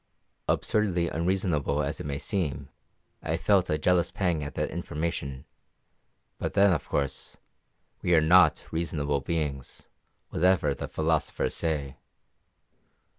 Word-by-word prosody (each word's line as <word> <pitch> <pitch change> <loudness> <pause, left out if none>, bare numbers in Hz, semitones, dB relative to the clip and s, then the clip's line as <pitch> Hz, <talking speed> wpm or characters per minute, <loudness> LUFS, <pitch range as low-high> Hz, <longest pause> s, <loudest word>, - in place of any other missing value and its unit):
Absurdly 90 -6 +1
unreasonable 85 -4 0
as 70 +3 -3
it - - -5
may 70 -1 -2
seem, 75 - -2 0.5
I 80 - -1
felt 90 +2 +2
a 75 - +2
jealous 85 +2 +2
pang 85 -6 -1
at 70 - -6
that - - -1
information; 75 -5 -4 0.9
but - - -3
then, 100 -1 +5
of 75 - -3
course, 70 -2 -2 0.6
we 90 - +3
are - - +7
not 90 +4 +5
reasonable 75 -3 -1
beings, 75 -5 -4 0.4
whatever 90 +2 +3
the - - -5
philosophers 80 -3 0
say. 75 -5 -2
80 Hz, 125 wpm, -28 LUFS, 75-90 Hz, 0.9 s, are